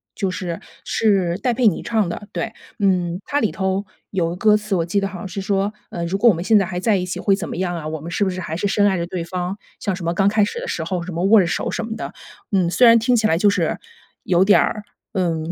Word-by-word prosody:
就 195 -3 -1
是， 175 -2 -4 0.2
是 190 -5 +1
戴 250 -2 +1
佩 240 -1 +3
妮 185 - +1
唱 220 -6 0
的， 205 +4 -6
对。 225 -1 -3 0.3
嗯， 180 -2 +1
它 290 0 0
里 220 - +1
头 190 +1 -1 0.2
有 175 -4 0
个 175 - -4
歌 210 +2 +4
词， 210 -1 -2
我 165 -2 0
记 200 +4 0
得 195 - -1
好 185 -2 -8
像 195 - -6
是 195 - -6
说， 200 +1 0 0.2
呃，” 170 - -4
如 190 +3 -1
果 235 +3 +5
我 - - +5
们 170 - -4
现 215 +1 +5
在 195 - +1
还 180 0 -5
在 200 +2 +2
一 180 - -2
起 180 - -4
会 200 - +3
怎 195 - -4
么 - - -5
样 180 0 -1
啊？ 160 -3 -5
我 155 -1 -4
们 170 +2 -7
是 200 +2 +1
不 190 - +1
是 185 0 -4
还 160 -1 -4
是 205 - 0
深 205 +1 +2
爱 190 -3 +3
着 170 0 -2
对 175 -2 -4
方“， 180 +3 -4 0.2
像 195 -3 -1
什 180 - -8
么” 170 +1 0
刚 195 +2 +2
开 210 0 +3
始 355 - -2
的 - - -6
时 165 - -2
候 175 +1 -2
“什 180 -1 -6
么” 170 +2 -2
握 210 +2 +6
着 175 - +2
手 - - -2
“什 225 - -3
么 225 0 -5
的。 - - -6 0.4
嗯， 185 -3 +2
虽 245 +7 +4
然 230 0 +8
听 245 +2 +2
起 220 - +2
来 165 - +2
就 205 +3 +4
是 185 -5 0 0.5
有 180 0 +3
点 205 - +6
儿， 210 -1 0 0.3
嗯， 170 -3 -1
190 Hz, 315 characters per minute, -21 LUFS, 175-210 Hz, 0.5 s, 然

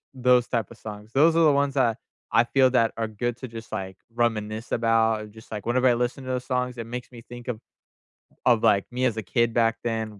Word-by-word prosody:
those 125 -1 +3
type 115 -2 -2
of 120 - -12
songs. 105 0 -9
Those 160 +4 +5
are 165 - +4
the 150 - +6
ones 140 0 +1
that 120 -5 +2 0.3
I 115 - +5
feel 130 +1 +4
that 115 -3 +3
are 115 -1 -1
good 115 +2 -3
to 130 - -7
just, 115 -1 -10
like, 95 -1 -5 0.2
reminisce 110 -2 -1
about, 115 -1 +2
and 105 -1 -10
just, 110 0 -15
like, 105 -1 -5
whenever 130 +2 +3
I 120 - +5
listen 125 +3 -2
to 130 - -3
those 125 0 -2
songs, 125 -1 -2
it 115 - -5
makes 125 +1 -6
me 120 -1 -11
think 120 0 -10
of 120 -3 -3 0.9
of, 120 -3 +4
like, 100 -1 +4
me 125 +1 -1
as 115 -3 +1
a 110 - -3
kid 115 +4 +1
back 115 -1 +2
then 110 -3 -3
120 Hz, 240 wpm, -25 LUFS, 110-125 Hz, 0.9 s, the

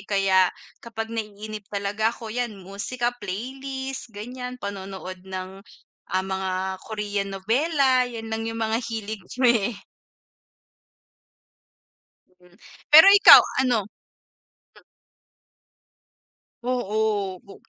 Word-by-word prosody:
Kaya 190 -2 +3 0.3
kapag 225 -1 -6
naiinip 215 -1 -6
talaga 205 +2 -1
ako, 230 -1 -7
yan 240 -4 -3
musika, 205 +6 -3
playlist 265 +6 -6
ganyan, 250 +3 -7
panonood 190 -3 -7
ng, 190 +1 -7 0.5
ah, 185 +1 -1
mga 190 -1 -3 0.4
Korean 205 -2 -3
novela, 255 - +2
yan 225 -2 -7
lang 225 0 -2
yung 225 - -5
mga 220 +2 0
hilig 220 -2 -5 0.2
me. 235 -4 +2 2.6
Hmm, 180 0 -22 0.4
pero 320 +5 +10
ikaw, 405 - +10 0.2
ano? 235 -5 +1 2.8
Oo, 215 -6 -1
o 200 - -15
220 Hz, 90 wpm, -24 LUFS, 195-245 Hz, 2.8 s, pero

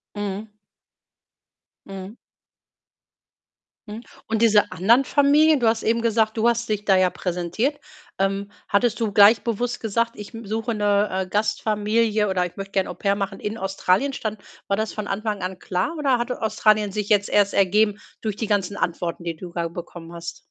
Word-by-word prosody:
Mhm. 205 +1 -4 1.4
Mhm. 195 +2 -8 1.7
Mhm. 220 +3 -8 0.2
Und 225 0 -1
diese 210 -3 +4
anderen 225 +9 +3
Familien 290 +1 +4
du 235 - +2
hast 225 0 +1
eben 230 +1 +1
gesagt, 225 -1 +1
du 225 - +3
hast 235 0 0
dich 210 -1 -2
da 195 - +4
ja 185 -1 +4
präsentiert. 180 - -2 0.4
Ähm, 195 +1 -1 0.2
hattest 225 +3 +1
du 220 -3 0
gleich 205 +3 +6
bewusst 240 +1 -2
gesagt: 230 +1 0
„Ich, 210 +3 -10
hm, 225 0 -8
suche 225 +3 -2
'ne, 205 0 +2
äh, 185 - -10
Gastfamilie“, 210 +1 +1
oder: 185 -1 +1
„Ich 180 - -9
möchte 195 0 -7
gern 190 -1 +1
Au-pair 200 +3 -1
machen 195 -1 -4
in 210 +2 -4
Australien“, 195 +6 0
stand 215 -4 -4 0.3
war 200 - 0
das 220 0 -2
von 215 -1 -5
Anfang 210 0 -3
an 185 0 -4
klar 185 - -2
oder 275 -5 +2
hatte 245 +1 -3
Australien 215 -1 +2
sich 210 0 -3
jetzt 205 -1 +3
erst 205 -1 +3
ergeben 205 +2 +3 0.2
durch 215 -3 -2
die 220 - -3
ganzen 200 -1 0
Antworten, 170 0 -2
die 170 -1 -3
du 175 +2 -9
da 170 -1 -1
bekommen 170 0 -9
hast? 170 0 -7
210 Hz, 175 wpm, -23 LUFS, 195-225 Hz, 1.7 s, gleich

